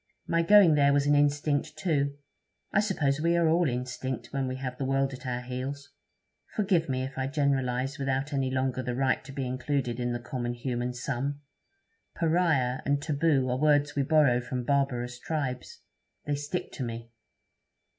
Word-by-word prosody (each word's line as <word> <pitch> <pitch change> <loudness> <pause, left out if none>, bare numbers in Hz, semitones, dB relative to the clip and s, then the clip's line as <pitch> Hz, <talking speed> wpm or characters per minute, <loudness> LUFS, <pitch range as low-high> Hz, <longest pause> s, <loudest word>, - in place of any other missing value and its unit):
My 165 0 +2
going 195 -1 +7
there 140 -1 +4
was 140 0 +2
an 145 - +4
instinct, 145 +1 +1
too. 140 -4 0 0.6
I - - +4
suppose 150 -9 0
we 170 +1 +2
are 170 -1 +3
all 165 -1 +3
instinct 125 0 -4
when 135 -1 -1
we 130 - -3
have 130 -1 -5
the - - -1
world 135 0 +1
at 130 0 -8
our 125 0 -2
heels. 130 +3 -5 0.6
Forgive 185 -7 +1
me 130 0 -1
if 135 0 -6
I 130 - 0
generalize 135 -2 0
without 135 +1 -1
any 135 -1 0
longer 130 -1 -1
the 125 -1 -3
right 130 0 +1
to 135 - -10
be 135 -1 -3
included 125 -1 -2
in 120 0 -1
the 120 - -1
common 120 0 -4
human 120 0 -3
sum. 140 +3 -3 0.7
"Pariah" 160 -7 +1
and 140 0 +1
"taboo" 145 -2 +1
are 125 - -1
words 150 -1 +3
we 140 - +2
borrow 140 -4 +4
from 125 0 -4
barbarous 125 -3 0
tribes; 130 -4 -4 0.4
they 145 - -1
stick 145 +5 -3
to 130 - -5
me.' 115 0 -6
135 Hz, 175 wpm, -28 LUFS, 125-145 Hz, 0.7 s, going